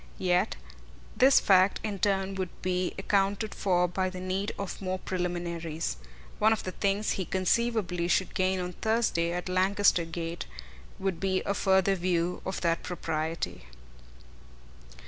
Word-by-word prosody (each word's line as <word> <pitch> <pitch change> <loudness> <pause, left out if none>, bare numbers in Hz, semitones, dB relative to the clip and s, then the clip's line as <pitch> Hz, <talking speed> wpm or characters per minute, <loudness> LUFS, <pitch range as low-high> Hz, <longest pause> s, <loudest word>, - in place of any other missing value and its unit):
Yet 180 -1 +1 0.6
this 265 +1 +6
fact 190 0 +4
in 205 -3 -3
turn 195 -1 +1
would 190 -2 -3
be 180 0 -1
accounted 200 +2 0
for 180 -3 +2
by 185 +2 -1
the 185 0 -7
need 185 +2 -2
of 200 0 -5
more 185 -1 -2
preliminaries. 170 - -3 0.4
One 215 +1 +5
of 225 - 0
the 185 - -4
things 200 +3 0
he 190 - -1
conceivably 190 -2 0
should 185 +1 +1
gain 185 0 +1
on 180 0 -4
Thursday 220 -7 +1
at 175 +1 -3
Lancaster 185 -1 +3
Gate 165 +1 -5 0.5
would 190 -3 -2
be 190 -1 0
a 200 - 0
further 190 0 +3
view 175 -1 0
of 190 - -3
that 170 -1 +1
propriety. 160 - -3
185 Hz, 145 wpm, -29 LUFS, 175-195 Hz, 0.6 s, this